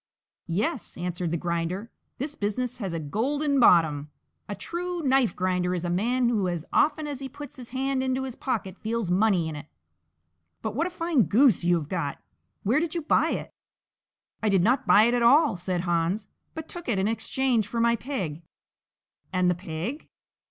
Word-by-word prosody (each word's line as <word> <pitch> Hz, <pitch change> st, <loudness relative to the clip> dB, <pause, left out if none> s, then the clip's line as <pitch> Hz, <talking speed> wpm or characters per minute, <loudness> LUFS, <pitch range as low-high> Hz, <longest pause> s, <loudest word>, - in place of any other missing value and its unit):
"Yes," 215 Hz, -, -2 dB
answered 175 Hz, 0 st, -2 dB
the 170 Hz, -, -1 dB
Grinder, 170 Hz, +6 st, -3 dB, 0.3 s
"this 285 Hz, +3 st, -4 dB
business 250 Hz, +2 st, -2 dB
has 195 Hz, -5 st, -3 dB
a 165 Hz, -, -3 dB
golden 275 Hz, -, 0 dB
bottom! 155 Hz, -, +4 dB, 0.4 s
A 205 Hz, -, -3 dB
true 350 Hz, -, -4 dB
knife 265 Hz, -7 st, +3 dB
grinder 180 Hz, -1 st, 0 dB
is 175 Hz, 0 st, -3 dB
a 175 Hz, -, -1 dB
man 240 Hz, +7 st, +1 dB
who 210 Hz, -6 st, +1 dB
as 175 Hz, -2 st, -3 dB
often 310 Hz, 0 st, +3 dB
as 290 Hz, -3 st, -4 dB
he 270 Hz, -1 st, -6 dB
puts 290 Hz, +1 st, -9 dB
his 245 Hz, -2 st, -9 dB
hand 265 Hz, +1 st, -1 dB
into 260 Hz, 0 st, 0 dB
his 260 Hz, -2 st, -4 dB
pocket 195 Hz, -7 st, -3 dB
feels 220 Hz, -4 st, -2 dB
money 185 Hz, -3 st, +3 dB
in 160 Hz, -, -5 dB
it! 150 Hz, 0 st, -8 dB, 1.0 s
But 220 Hz, -2 st, -2 dB
what 325 Hz, +9 st, 0 dB
a -, -, -4 dB
fine 330 Hz, -, +1 dB
goose 220 Hz, -, +4 dB
you 175 Hz, 0 st, +4 dB
have 160 Hz, -4 st, -2 dB
got; 160 Hz, -5 st, -2 dB, 0.5 s
where 235 Hz, +9 st, +3 dB
did 335 Hz, +1 st, -2 dB
you 335 Hz, -, -2 dB
buy -, -, +3 dB
it?" -, -, -3 dB, 0.9 s
"I 220 Hz, -, +1 dB
did 190 Hz, -3 st, +3 dB
not 250 Hz, +6 st, +2 dB
buy 210 Hz, -, +7 dB
it 235 Hz, +2 st, +3 dB
at 245 Hz, -, +2 dB
all," 280 Hz, +4 st, +5 dB
said 180 Hz, 0 st, -2 dB
Hans, 175 Hz, +4 st, 0 dB, 0.3 s
"but 320 Hz, 0 st, -6 dB
took 345 Hz, -6 st, -7 dB
it 220 Hz, -, +1 dB
in 190 Hz, +1 st, +1 dB
exchange 230 Hz, 0 st, 0 dB
for 230 Hz, +3 st, -3 dB
my 235 Hz, 0 st, +4 dB
pig." 205 Hz, -, -4 dB, 0.9 s
"And 185 Hz, -2 st, +2 dB
the -, -, +3 dB
pig?" 175 Hz, -, -5 dB
220 Hz, 190 wpm, -26 LUFS, 180-265 Hz, 1.0 s, buy